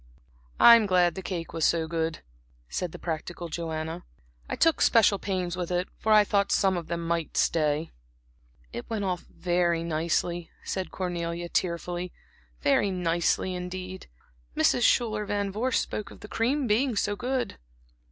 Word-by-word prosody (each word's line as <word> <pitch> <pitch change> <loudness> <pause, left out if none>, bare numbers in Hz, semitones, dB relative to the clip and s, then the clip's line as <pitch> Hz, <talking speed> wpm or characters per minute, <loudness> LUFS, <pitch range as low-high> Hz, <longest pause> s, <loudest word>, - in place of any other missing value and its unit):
"I'm 235 -3 +8
glad 180 -2 +3
the 190 - -6
cake 175 -3 -5
was 165 - -2
so 165 0 +3
good," 160 -1 -2 0.4
said 175 - -3
the - - -8
practical 170 +1 -5
Joanna. 160 +1 -4 0.5
"I - - -1
took 330 -2 +3
special 215 -4 +5
pains 185 -2 -2
with 180 -1 -3
it, 180 +1 -1
for 220 - 0
I 215 -1 +8
thought 200 -1 +1
some 190 -1 +3
of 170 -2 -4
them 170 0 -3
might 170 -1 -2
stay." 155 0 +1 0.8
"It 120 - -6
went 215 -3 -2
off 180 -2 -3
very 175 -2 0
nicely," 170 +1 -1
said 190 -1 -3
Cornelia, 175 -2 -3
tearfully, 175 0 -2 0.5
"very 145 +8 +3
nicely 175 0 0
indeed. 185 +1 -6 0.5
Mrs. 155 +9 +3
Schuyler 220 -3 +3
Van 200 -1 -1
Vorst 230 +5 0
spoke 210 - -5
of - - -14
the - - -9
cream 255 +7 0
being 240 +3 +2
so 205 0 0
good." 250 - -2
180 Hz, 155 wpm, -27 LUFS, 170-205 Hz, 0.8 s, I'm